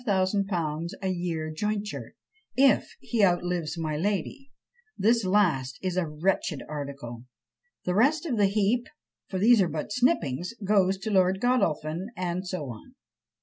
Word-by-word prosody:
_ 185 -5 0
a 190 - 0
year 170 -3 -2
jointure, 210 +5 -3 0.4
if 270 +1 +4
he 230 -4 0
outlives 175 -3 +1
my 155 -2 -2
lady: 205 - -2 0.5
this 230 +2 +3
last 170 -9 +2
is 185 -2 -1
a 185 -3 0
wretched 155 0 -1
article. 140 -5 -6 0.6
The 180 - 0
rest 285 - +3
of 280 -7 -1
the 205 -2 +4
heap, 215 +4 +1 0.4
for 190 - -3
these 220 +3 +6
are 180 - +2
but 155 +5 -4
snippings, 205 - +1
goes 195 -1 +3
to 215 +3 -4
Lord 190 -1 +3
Godolphin, 175 -8 0
and 180 +1 -2
so 180 -4 -3
on. 110 - -13
185 Hz, 145 wpm, -27 LUFS, 160-210 Hz, 0.6 s, these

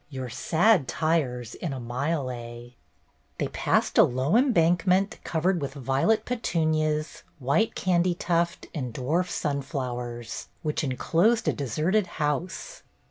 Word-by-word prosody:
Your 130 -3 -5
sad 170 - +3
tires 140 -8 -1
in 160 -5 -4
a 130 - -5
mile 130 +3 -2
a.' 120 0 -9 0.3
" - - -40
They - - -1
passed - - +1
a - - +10
low 130 - +1
embankment, 185 -5 +3
covered 170 +1 0
with 140 0 -4
violet 135 - +1
petunias, 155 -9 0 0.2
white 145 - +1
candytuft, 175 -1 +1
and 125 -7 -4
dwarf 165 +8 0
sunflowers, 125 -6 -4 0.2
which 155 +1 -1
enclosed 170 - +2
a - - +3
deserted 160 - 0
house. 150 +5 -2
155 Hz, 125 wpm, -26 LUFS, 130-175 Hz, 0.3 s, a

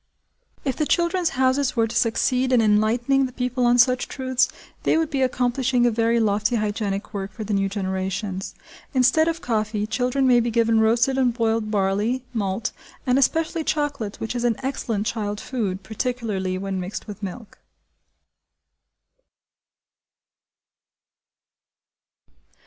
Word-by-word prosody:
If 265 -3 -1
the 305 - 0
"Children's 345 -3 +1
Houses" 260 +1 +2
were 230 -2 +3
to 225 +1 -6
succeed 250 +2 +1
in 250 - +5
enlightening 230 +5 +2
the - - -11
people 250 0 0
on 240 0 +4
such 250 +1 +4
truths, 260 -1 0 0.3
they - - +2
would 320 -1 0
be 275 -2 0
accomplishing 250 0 +1
a 240 - +4
very 230 +1 +2
lofty 210 +1 +1
hygienic 205 -2 -2
work 195 -1 -4
for 215 - -7
the 210 0 -3
new 195 0 +1
generations. 190 0 -3 0.4
Instead 265 +5 +4
of 330 0 -1
coffee, 215 -2 -1
children 250 +5 0
may 250 -2 +5
be 235 0 0
given 230 -1 +2
roasted 235 +4 +3
and 245 -3 +2
boiled 225 -2 0
barley, 210 +5 0
malt, 210 -1 -2 0.3
and 255 +1 +3
especially 325 +3 +1
chocolate 285 -10 -2
which 225 - -3
is 240 - -2
an 240 -2 +2
excellent 230 -6 -2
child 210 -2 -2
food, 200 -8 -3
particularly 215 -4 -2
when 195 0 -3
mixed 185 +2 -5
with 210 -1 -9
milk. 205 +3 -8
230 Hz, 140 wpm, -23 LUFS, 210-255 Hz, 0.4 s, in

